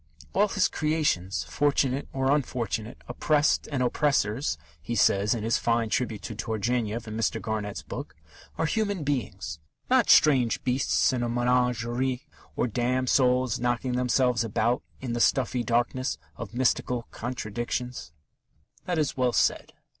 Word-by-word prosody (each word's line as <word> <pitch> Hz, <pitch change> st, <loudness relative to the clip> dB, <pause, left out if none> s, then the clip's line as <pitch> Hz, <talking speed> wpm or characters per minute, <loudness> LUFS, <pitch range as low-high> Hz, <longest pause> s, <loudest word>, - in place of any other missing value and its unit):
"All 205 Hz, -, +4 dB
his 200 Hz, -1 st, +2 dB
creations, 150 Hz, -, 0 dB
fortunate 135 Hz, -, 0 dB
or 135 Hz, 0 st, +1 dB
unfortunate, 120 Hz, -5 st, -3 dB
oppressed 145 Hz, +4 st, +1 dB
and 135 Hz, -3 st, 0 dB
oppressors," 125 Hz, -, +1 dB, 0.2 s
he 120 Hz, +10 st, -4 dB
says 100 Hz, +1 st, +3 dB
in 110 Hz, -, -4 dB
his 115 Hz, +1 st, +1 dB
fine 115 Hz, -1 st, +1 dB
tribute 110 Hz, -3 st, -1 dB
to 105 Hz, -, -5 dB
Turgenev 115 Hz, +1 st, -2 dB
in 110 Hz, -, -5 dB
Mr. 115 Hz, -1 st, 0 dB
Garnett's 105 Hz, -2 st, -4 dB
book, -, -, -7 dB, 0.4 s
"are 165 Hz, -, +1 dB
human 205 Hz, -1 st, -1 dB
beings, 135 Hz, -, -3 dB, 0.3 s
not 255 Hz, -3 st, +4 dB
strange 130 Hz, -7 st, +5 dB
beasts 130 Hz, +1 st, +2 dB
in 125 Hz, -, -1 dB
a 120 Hz, -, -1 dB
menagerie, 125 Hz, +1 st, 0 dB, 0.3 s
or -, -, +1 dB
damned 125 Hz, +2 st, 0 dB
souls 125 Hz, -2 st, +3 dB
knocking 120 Hz, +1 st, 0 dB
themselves 125 Hz, -1 st, +2 dB
about 115 Hz, +4 st, 0 dB, 0.2 s
in 125 Hz, -3 st, -3 dB
the 120 Hz, -, -1 dB
stuffy 125 Hz, -1 st, +2 dB
darkness 120 Hz, -3 st, 0 dB, 0.2 s
of 110 Hz, -, -8 dB
mystical 125 Hz, -1 st, +1 dB
contradictions." 120 Hz, -, -4 dB, 0.7 s
That 175 Hz, -2 st, -1 dB
is 150 Hz, -3 st, 0 dB
well 125 Hz, -2 st, +1 dB
said. -, -, +1 dB
125 Hz, 140 wpm, -27 LUFS, 115-130 Hz, 0.7 s, strange